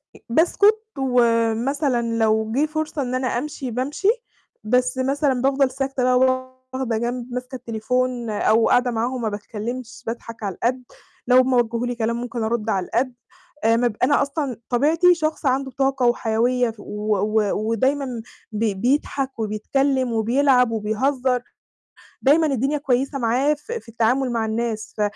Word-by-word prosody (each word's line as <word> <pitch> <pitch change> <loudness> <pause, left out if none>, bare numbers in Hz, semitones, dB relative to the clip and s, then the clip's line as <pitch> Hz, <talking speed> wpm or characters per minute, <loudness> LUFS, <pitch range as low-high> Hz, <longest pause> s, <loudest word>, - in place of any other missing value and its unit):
أ - - -14
باسكُت، 405 - +4 0.2
ومثلًا 245 +1 +1 0.2
لو 220 -1 +1
جه 275 +6 +2
فرصة 310 -1 -3
إن 255 -1 -2
أنا 255 0 -1
أمشي 260 0 -3
بامشي، 275 - -2 0.6
بس 250 +3 +1
مثلًا 270 0 +1
بافضل 270 0 +2
ساكتة 270 0 -2
بقى 250 0 +4 0.5
واخدة 255 -4 -1
جنب، 240 +1 -3
ماسكة 250 +1 -5
التليفون، 245 +1 -2
أو 220 +2 +2
قاعدة 245 0 +3
معاهم 240 +2 -2
ما 220 - 0
باتكلّمش، 230 +3 -6
باضحك 230 -1 -6
على 195 -3 -3
القد، 250 +5 -1 0.4
لو 250 0 +6
هُم 255 0 +4
وجّهوا 235 -1 +1
لي 245 - -3
كلام 230 0 -1
ممكن 240 -1 -4
أرد 225 0 -1
على 190 -4 0
القد. 250 +5 -1 0.5
آآ 225 +1 +4
ما 245 +1 +2
ب 220 - -4
أنا 285 +3 +4
أصلًاً 280 -3 -2
طبيعتي 320 +8 +4
شخص 310 -1 -2
عنده 265 0 +1
طاقة 270 -1 0
وحيوية 240 +1 +1
ف 225 - -19
و 210 +1 -2
و 210 +1 +1 0.2
ودايمًا 260 +1 0 0.3
بي 215 -1 0
بيضحك 265 +4 -1
وبيتكلّم 255 +4 0
وبيلعب 250 +2 +3
وبيهزّر. 250 +4 0 0.8
دايمًا 310 +4 +4
الدنيا 275 +2 0
كويّسة 275 0 0
معاه 250 +5 +2
ف 295 +9 -10
في 465 - -6
التعامل 240 +3 +1
مع 230 -2 0
الناس، 220 -1 -3
ف - - -1
250 Hz, 155 wpm, -22 LUFS, 230-270 Hz, 0.8 s, لو